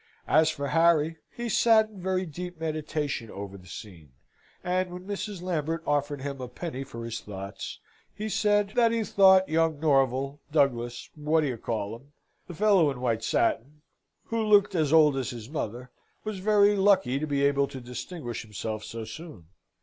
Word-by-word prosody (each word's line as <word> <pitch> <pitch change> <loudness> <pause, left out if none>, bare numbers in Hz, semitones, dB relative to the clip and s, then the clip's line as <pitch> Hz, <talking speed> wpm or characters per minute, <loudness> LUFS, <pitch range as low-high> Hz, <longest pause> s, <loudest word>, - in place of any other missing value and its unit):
As 155 0 +4
for 140 -3 -3
Harry, 165 +1 +3
he 240 0 -5
sate 225 0 +5
in 195 -3 -11
very 185 0 0
deep 175 +1 -7
meditation 155 -6 -3
over 100 -1 -7
the 90 -2 -13
scene; 85 - -11 0.5
and 180 0 0
when 180 +1 -9
Mrs. 205 -2 -5
Lambert 165 -2 -2
offered 145 -1 0
him 140 -2 -5
a 125 - -4
penny 135 +1 -5
for 115 -4 -8
his 115 0 -4
thoughts, 100 0 -7 0.3
he 215 - -5
said, 205 -1 +2
"That 235 -2 +4
he 230 -1 0
thought, 190 -2 +5
Young 160 -1 +1
Norval, 135 -2 +1
Douglas, 120 -5 0
What 155 +1 +1
d'ye 135 -5 -1
call 110 -2 -3
'em, 135 +5 -13 0.3
the 175 - -8
fellow 195 -5 +4
in 135 -3 -5
white 115 -3 -1
satin 140 +7 0 0.4
who 230 -1 -2
looked 205 -2 +4
as 155 -5 +1
old 155 -3 +6
as 130 -3 -2
his 115 -3 -7
mother 125 -3 -5 0.3
was 215 -3 -4
very 205 +1 +4
lucky 190 -9 +3
to 155 - -3
be 140 -1 +1
able 140 0 +2
to 130 - -8
distinguish 125 +1 -6
himself 110 0 -5
so 115 -1 -6
soon. 110 - -10
150 Hz, 175 wpm, -27 LUFS, 125-185 Hz, 0.5 s, old